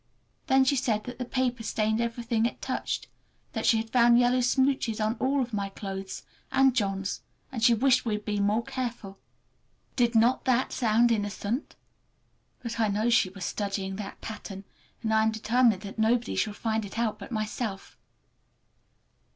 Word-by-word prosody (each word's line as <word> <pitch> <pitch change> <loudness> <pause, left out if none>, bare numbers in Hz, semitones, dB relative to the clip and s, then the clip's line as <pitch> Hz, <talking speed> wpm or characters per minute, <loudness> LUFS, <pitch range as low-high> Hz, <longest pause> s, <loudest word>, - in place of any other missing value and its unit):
Then 265 0 +4
she 280 - +3
said 220 -5 0
that 245 0 -8
the 250 - -2
paper 250 -1 -1
stained 220 0 0
everything 235 -1 0
it - - -8
touched, - - -3 0.5
that - - -1
she 225 - +5
had 225 0 -4
found 240 -1 +5
yellow 245 +1 +3
smooches 255 -2 +1
on 215 +1 +1
all 270 0 +1
my 200 -2 -2
clothes 195 -1 -6 0.3
and 265 -1 +4
John's, 195 -4 -1 0.3
and 235 -4 -4
she 240 -1 +6
wished 255 +2 +3
we 220 -3 -1
would 210 - -11
be 210 -1 -1
more 210 +3 +1
careful! 235 -6 -5 0.8
Did 240 -2 +2
not 235 +3 +3
that 255 -1 +1
sound 235 0 +3
innocent? 210 +4 -2 0.9
But 230 -1 -5
I 220 - +3
know 215 +4 +1
she 230 -5 +4
was 185 -1 -7
studying 195 -2 -3
that 205 -2 -7
pattern, 200 -3 -7 0.4
and 220 -1 0
I 220 - +4
am 220 - +3
determined 220 -1 +2
that 200 +2 -8
nobody 230 +2 +1
shall 215 - 0
find 220 0 -1
it 200 +2 -8
out 220 -2 -1
but 200 - -10
myself! 215 -2 -4
225 Hz, 170 wpm, -28 LUFS, 210-245 Hz, 0.9 s, she